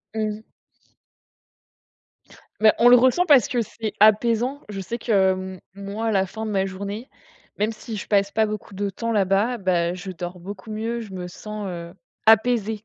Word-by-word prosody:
Mmh. 215 -1 -2 2.2
Mais 215 - +7
on 240 +1 +6
le 245 - +9
ressent 260 +9 +3
parce 285 - +6
que 245 -2 0
c'est 215 -1 -5
apaisant. 230 +6 +3
Je 195 -2 -5
sais 230 +6 -4
que, 195 -5 +3
mmh, 185 -1 -6 0.2
moi, 200 +3 -4
à 225 - +1
la 195 -2 +2
fin 220 +4 -6
de 215 - -3
ma 195 -1 +1
journée, 200 +6 -6 0.5
même 215 +2 0
si 225 +1 -8
je 205 - -6
passe 200 -1 +2
pas 220 - +2
beaucoup 215 -1 -6
de 200 +1 -2
temps 230 +4 -4
là-bas, 205 +4 +2
bah 180 -4 +1
je 185 +1 -7
dors 175 +1 -7
beaucoup 205 +4 -9
mieux, 225 +2 -3
je 210 -4 -9
me 180 -1 -5
sens, 210 +3 -7
heu, 170 -1 -7 0.3
apaisée. 220 -1 +4
210 Hz, 180 wpm, -23 LUFS, 190-225 Hz, 2.2 s, le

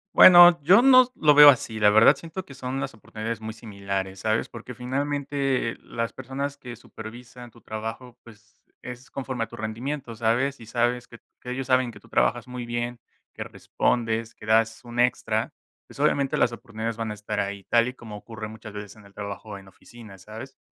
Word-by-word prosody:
Bueno, 175 -1 +9
yo 190 +9 +6
no 255 -1 +7
lo 150 -1 +4
veo 145 0 +11
así, 115 -5 +1
la 105 -1 +5
verdad, 110 +2 +6
siento 170 +3 -8
que 135 - -14
son 130 0 -4
las 135 -3 -5
oportunidades 110 +1 -6
muy 110 0 -6
similares, 100 -3 -5
¿sabes? 110 +1 0
Porque, 120 +1 -9
finalmente, 135 0 -2
las 115 0 -4
personas 135 +2 -5
que 125 -4 -9
supervisan 120 +2 -11
tu 120 - -20
trabajo, 115 +4 -7
pues, 110 -2 -19 0.2
es 125 +1 -10
conforme 130 -3 -4
a - - -5
tu - - -12
rendimiento, 120 +4 -5
¿sabes? 120 +5 0
Y 115 - -12
sabes 120 +1 -1
que 115 - -14 0.2
que 125 - -7
ellos 130 +1 -4
saben 130 -2 +2
que - - -14
tú - - -21
trabajas 120 -1 +1
muy 125 -1 -6
bien, 120 0 -4 0.3
que - - -6
respondes, 115 -1 -2
que 105 - -14
das 115 +1 +2
un 120 0 -7
extra, 125 0 0 0.3
pues, - - -15
obviamente, 140 -1 +1
las 120 - +2
oportunidades 115 -1 -6
van 115 -1 -3
a - - -3
estar 105 0 -5
ahí, 100 0 -3
tal 120 0 +3
y 125 - -5
como 115 -5 -10
ocurre 110 +1 -8
muchas 110 -1 -11
veces 105 -1 -8
en 110 -2 -17
el 100 - -18
trabajo 100 0 -7
en 95 - -17
oficinas, 100 0 -15
¿sabes? 110 +6 -10
120 Hz, 195 wpm, -25 LUFS, 110-130 Hz, 0.3 s, veo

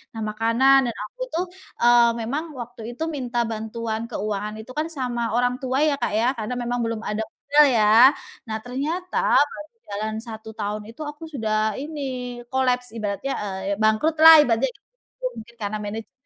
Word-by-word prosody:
Nah 225 - -4
makanan 230 +5 +4
dan 230 - -6
aku - - -11
tuh, 350 +3 0 0.4
eee, 240 0 +6
memang 280 +8 -2
waktu 240 -1 -8 0.2
itu - - -2
minta 245 -5 -1
bantuan 220 +1 -4
keuangan 210 -1 -3
itu 220 +3 -10
kan 310 - 0
sama 245 -2 -2
orang 245 +1 +2
tua 260 0 -1
ya, 305 -1 +3
Kak, - - +1
ya, 225 +3 +2
karena 220 +2 -3
memang 245 +1 -2
belum 230 -1 -3
ada 210 +1 -2
modal 290 +5 +3
ya. 225 +1 +7 0.4
Nah 220 - -1
ternyata 310 +9 -1 0.2
baru 300 - -8
berjalan 215 - -5
1 220 -2 -9
tahun 210 0 -3
itu 230 +7 -11
aku 295 +2 -8
sudah 215 -4 0
ini, 295 +2 -6 0.5
kolaps 250 -1 +1
ibaratnya, 215 +5 -3
eee, 195 0 -3
bangkrut 220 +9 +3
lah 320 -1 +11
ibaratnya 250 -1 +1
gitu, - - -15
mungkin 225 +2 -10
karena 210 0 -3
manajemennya 215 +2 -6
235 Hz, 170 wpm, -23 LUFS, 215-270 Hz, 0.5 s, lah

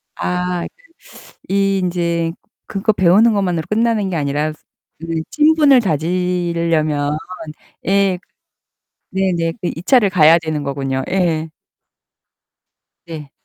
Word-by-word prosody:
아. 180 0 -2
그 - - -15 0.8
이 195 0 +2
인제 170 -2 -1 0.4
그거 200 +2 0
배우는 200 +5 +4
것만으로 180 -5 0
끝나는 220 -2 +1
게 180 - -3
아니라 150 0 -1 0.5
그 165 0 -3
친분을 300 -3 +5
다지려면. 165 -3 0 0.7
예. 195 -1 +2 0.9
네네. 180 -3 0
그 175 - -2
2 165 - -6
차를 235 -3 +4
가야 165 -3 +6
되는 155 -3 -3
거군요. 135 -1 -2
예. 165 -4 0 1.6
네. 155 -4 -9
175 Hz, 195 characters per minute, -18 LUFS, 160-195 Hz, 1.6 s, 가야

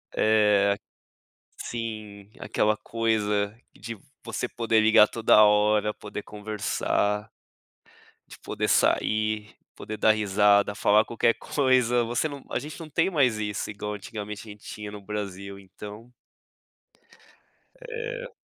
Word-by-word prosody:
é, 105 -2 +3 0.8
sim. 110 -3 -6
Aquela 105 0 +1
coisa 105 -2 -1 0.2
de 115 0 -7 0.3
você 125 - -3
poder 115 -2 +1
ligar 110 -1 +6
toda 110 -2 +5
hora, 105 0 +3
poder 105 0 -7
conversar 105 0 -2 1.0
de - - -12
poder - - -3
sair 110 0 +1 0.2
poder 110 - -6
dar 110 - +4
risada, 105 -1 +3
falar 105 +1 +4
qualquer 115 0 +2
coisa, 125 -3 +2
você 120 +6 0
não 140 -2 -9
a - - 0
gente 150 +2 -8
não 160 - -8
tem 165 +5 +1
mais 130 - +2
isso 105 -1 -3
igual 105 0 -5
antigamente 105 +1 -7
a - - -7
gente 105 0 -14
tinha 105 -1 -8
no 105 - -8
Brasil 100 -1 -6
então. 105 +4 -11 1.8
É. - - -5
105 Hz, 125 wpm, -26 LUFS, 105-115 Hz, 1.8 s, ligar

